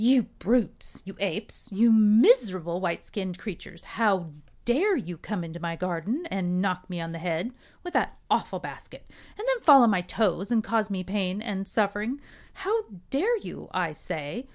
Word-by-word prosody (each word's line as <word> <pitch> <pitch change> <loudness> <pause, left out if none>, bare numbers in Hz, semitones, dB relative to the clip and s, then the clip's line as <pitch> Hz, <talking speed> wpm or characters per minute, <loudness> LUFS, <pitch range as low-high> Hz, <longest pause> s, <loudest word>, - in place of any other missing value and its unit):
"You 250 +1 +6 0.2
brutes! 230 +1 0
you 195 - -9
apes! 200 +2 -3
you 225 +4 +5
miserable 210 -5 +5
white 170 -2 -2
skinned 190 -3 -4
creatures! 175 -4 -9
How 195 -7 0 0.3
dare 350 - +3
you 180 - -4
come 180 +3 -4
into 165 +1 -7
my 170 0 -3
garden 185 - -2
and 180 -2 0
knock 185 -1 -1
me 175 -1 -4
on 165 0 -4
the 165 - -6
head 170 +6 -2 0.3
with 355 0 -6
that - - 0
awful - - 0
basket - - -10 0.3
and 435 +4 -5
then - - +1
fall 275 -5 +9
on 230 - +5
my 185 -3 +2
toes 195 +1 0
and 225 -2 +3
cause 220 -2 0
me 190 -2 -2
pain 190 0 -1
and 200 -3 -4
suffering? 215 +6 0 0.5
How 435 +2 +1 0.3
dare 410 - +2
you, - - -9
I 175 -4 0
say? 160 - -5
200 Hz, 175 wpm, -27 LUFS, 180-235 Hz, 0.5 s, fall